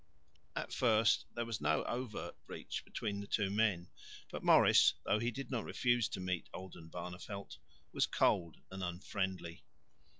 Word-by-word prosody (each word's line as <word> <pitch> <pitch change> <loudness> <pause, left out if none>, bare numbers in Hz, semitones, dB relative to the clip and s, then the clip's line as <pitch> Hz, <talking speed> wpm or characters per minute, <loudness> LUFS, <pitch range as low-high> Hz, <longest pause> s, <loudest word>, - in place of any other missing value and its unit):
At - - -3
first 110 -3 +4
there 120 0 -1
was 115 -6 -4
no 75 +1 +2
overt 120 -3 -4
breach - - -5
between 100 -2 -3
the 100 - -6
two 100 -2 +1
men, 100 -5 +1 0.4
but - - -5
Maurice, - - +7
though 105 - +2
he 120 +2 +1
did 135 +4 -6
not 120 -4 -1
refuse 120 -3 +1
to - - -4
meet 90 -2 -2
Oldenbarneveldt, 90 +2 -7 0.3
was - - +2
cold 85 -2 +2
and 95 0 -5
unfriendly. 90 -1 -3
100 Hz, 145 wpm, -35 LUFS, 90-115 Hz, 0.4 s, Maurice